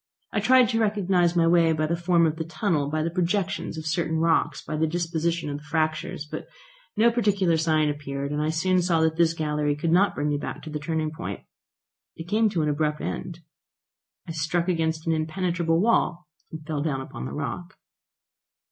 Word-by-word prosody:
I 215 - +1
tried 250 +4 +5
to 225 - +1
recognise 190 -5 +2
my 170 -1 +4
way 165 -1 +4
by 155 0 0
the 165 +2 0
form 170 0 +3
of 160 0 0
the 165 - -2
tunnel, 160 -3 -1
by 155 +1 -1
the 165 - -1
projections 180 0 -1
of 160 - -6
certain 160 0 0
rocks, 165 0 +2
by 155 - -5
the 160 +1 +1
disposition 170 0 -1
of 145 - -3
the - - -17
fractures. 155 -1 -1
But 150 - -7 0.5
no 230 +2 +5
particular 200 -7 +2
sign 155 -1 +2
appeared, 140 -1 -4
and 150 0 -1
I 155 - 0
soon 180 +3 +2
saw 170 -2 +2
that 160 0 +1
this 165 -1 +3
gallery 150 -2 0
could 160 +2 -1
not 190 +4 +3
bring 145 +1 -1
me 145 -1 0
back - - -6
to 155 - -8
the 150 - -3
turning 155 0 -2
point. 165 +3 -6 0.7
It 165 - -8
came 215 +3 +2
to 175 -6 0
an 150 - +1
abrupt 150 0 0
end. 170 -1 -5 0.9
I - - -4
struck 165 +2 -1
against 160 -2 0
an 165 - +2
impenetrable 165 +1 0
wall, 180 -4 +1 0.3
and 160 -1 -8
fell 155 -2 -2
down 145 -3 -1
upon 130 - -7
the - - -7
rock. 150 +6 -5
165 Hz, 200 wpm, -25 LUFS, 155-175 Hz, 0.9 s, tried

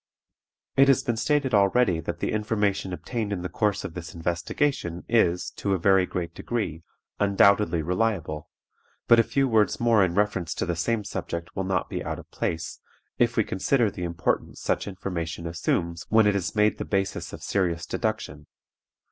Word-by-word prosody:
It 135 +1 +7
has 135 -2 +4
been 120 - 0
stated 130 +3 +1
already 100 -2 +3
that - - -5
the - - 0
information 105 -3 0
obtained 110 +3 -3
in 90 -3 -3
the 90 - -3
course 105 +3 0
of - - -6
this 85 +1 -8
investigation 85 - -1
is, 90 -7 +2
to 100 -1 0
a - - 0
very 95 +1 +4
great 85 -2 -4
degree, 105 -9 -3 0.4
undoubtedly 100 -4 +4
reliable; 90 -5 -1 0.6
but 115 - +7
a - - +6
few 135 +4 +1
words 110 -4 +2
more 115 -4 +4
in 90 -2 0
reference 100 -5 0
to - - -1
the 85 - -1
same 110 +6 0
subject 85 -4 -5
will 95 - -2
not 95 -2 0
be - - -4
out - - -3
of - - -13
place, 85 +1 -3 0.4
if 120 0 +2
we 110 - +5
consider 105 +4 +1
the 90 - -6
importance 85 -1 -2
such - - -1
information 85 -4 -4
assumes 85 0 -2
when 110 0 +5
it 105 -1 +3
is 95 +2 -2
made 105 0 +3
the - - -1
basis 95 -1 -2
of - - -9
serious 85 -4 0
deduction. 95 -8 -3
95 Hz, 180 wpm, -26 LUFS, 85-110 Hz, 0.6 s, It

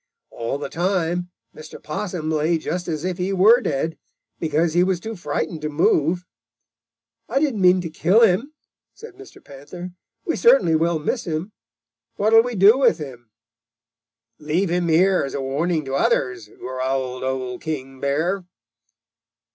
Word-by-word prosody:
All 115 +4 -3
the 140 0 -5
time 175 +1 -1 0.3
Mr. 155 0 -10
Possum 160 -1 -4
lay 160 +2 +1
just 175 +3 -4
as 160 -1 -3
if 185 -1 -3
he 185 +2 -1
were 210 +6 +5
dead, 160 - -2 0.4
because 160 0 0
he 175 +1 +4
was 185 -1 0
too 220 +5 -6
frightened 160 -2 -3
to 155 - -3
move. 160 +3 +1 1.0
'I 260 +5 +1
didn't 275 -9 0
mean 180 0 +5
to 170 - -5
kill 190 +7 +3
him,' 225 +6 +3 0.4
said 460 - -11
Mr. 395 +1 -15
Panther. 145 +6 -9 0.3
'We - - -1
certainly 470 - +5
will 165 +1 +1
miss 160 - -2
him. 165 +4 -3 0.6
What 215 +2 +1
will 225 - +9
we 245 0 -4
do 205 +6 +6
with 275 - +4
him?' 125 -7 -9 1.1
"'Leave 165 +5 -1
him 175 0 0
here 180 +4 +3
as 135 - -5
a - - -2
warning 155 +4 -1
to 135 - -5
others,' 125 -4 0
growled 130 0 -3
Old 130 -1 -3
King 135 -4 -5
Bear. 160 +8 -1
165 Hz, 155 wpm, -22 LUFS, 145-185 Hz, 1.1 s, will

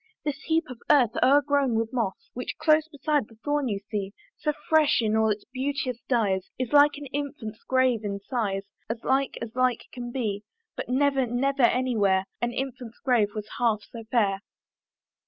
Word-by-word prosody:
This 295 -2 -2
heap 325 +1 +2
of 250 -4 -10
earth 255 -7 +5
o'ergrown 280 -2 +4
with 225 +1 -1
moss 225 -6 -3
Which 250 - -5
close 310 0 +3
beside 295 -4 0
the 225 - -18
thorn 290 -2 +1
you 205 -4 -1
see, 200 -2 -3 0.3
So 300 - +1 0.2
fresh 315 -2 +4
in 220 -2 +1
all 220 0 +3
its 210 -1 -2
beauteous 260 -1 -3
dyes, 200 -7 +1
Is 255 +1 -3
like 290 0 +6
an 290 - -7
infant's 275 -7 -5
grave 260 -4 +2
in 200 -1 -3
size 200 -3 -2 0.3
As 230 0 -4
like 270 0 +1
as 230 -1 -7
like 255 -2 +1
can 240 -1 -6
be: 215 -5 -2 0.3
But - - -5
never, 270 0 +2
never 270 +4 0
any 250 +1 +3
where, 195 -2 +3 0.2
An 240 0 0
infant's 250 -2 -5
grave 225 -6 +1
was 210 -1 -4
half 225 -3 +2
so 230 -1 -8
fair. 200 -6 +2
245 Hz, 180 wpm, -26 LUFS, 220-275 Hz, 0.3 s, like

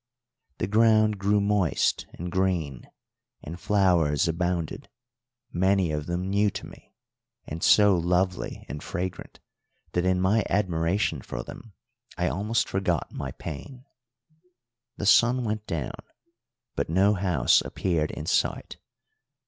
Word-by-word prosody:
The - - -1
ground 110 0 +3
grew 100 +1 +2
moist 100 -4 +1
and 85 +1 -6
green, 85 -8 -1 0.5
and 85 +4 -8
flowers 85 -7 +2
abounded, 85 0 -2 0.6
many 95 -1 +2
of 75 -1 -3
them 90 +2 -2
new 100 +2 +2
to - - -7
me, - - -16 0.5
and 80 +2 -6
so 105 -2 +5
lovely 90 +1 -1
and 75 - -6
fragrant 95 -1 -5 0.5
that 90 - 0
in 95 0 +2
my 100 +4 +2
admiration 95 0 0
for - - -6
them 115 -4 -11 0.4
I - - +1
almost 105 - 0
forgot 90 -4 -1
my - - -5
pain. 125 - -8 1.1
The - - -4
sun 120 +4 +5
went 110 -1 -3
down, 80 -8 -4 0.8
but - - -2
no 95 +5 +3
house 90 -10 +3
appeared 80 -4 -1
in 75 - -6
sight. - - -1
95 Hz, 125 wpm, -26 LUFS, 85-105 Hz, 1.1 s, so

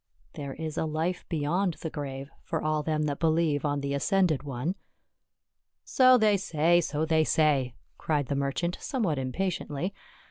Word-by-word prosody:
" 85 - -37
There 140 -3 -6
is 160 -1 -4
a - - 0
life 160 +3 -2
beyond 170 +3 0
the 160 - -6
grave 135 -1 -6
for 165 - -3
all 155 0 0
them 155 0 -1
that 145 -2 -2
believe 160 -3 +2
on 145 -1 0
the 140 0 -2
ascended 175 0 +2
One." 140 +4 -3 1.1
"So 255 -1 +5
they 215 -3 +4
say, 170 -1 +2
so 155 -1 -1
they 160 0 +3
say," 140 -6 +2 0.2
cried 150 -3 0
the 140 - -2
merchant, 140 +6 -1
somewhat 195 - -1
impatiently. 170 +4 -2
155 Hz, 165 wpm, -28 LUFS, 145-170 Hz, 1.1 s, So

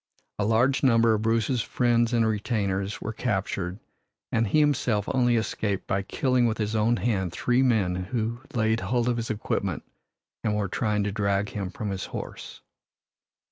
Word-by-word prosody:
A 100 - +1
large 120 +5 +3
number 115 -4 +4
of 105 - 0
Bruce's 115 +2 +1
friends 120 0 +1
and 115 -2 +3
retainers 100 -2 -1
were 110 - -4
captured, 95 -5 -2 0.5
and 115 -1 +2
he 155 - +3
himself 125 -8 +2
only 120 -2 +3
escaped 105 -3 -1
by 95 - 0
killing 125 +4 +1
with 110 - -1
his 105 0 -2
own 110 +2 +2
hand 95 -3 0
three 125 +7 +1
men 110 -8 +2
who 115 +2 -2
laid 110 -1 +2
hold 120 +5 0
of 120 -1 +1
his 115 0 -3
equipment 110 -1 -2 0.6
and 105 -2 +1
were 105 -1 0
trying 105 +2 0
to 105 - -1
drag 100 0 0
him 100 -3 -4
from 105 +1 -4
his 95 -1 -3
horse. - - -7
110 Hz, 170 wpm, -26 LUFS, 100-120 Hz, 0.6 s, number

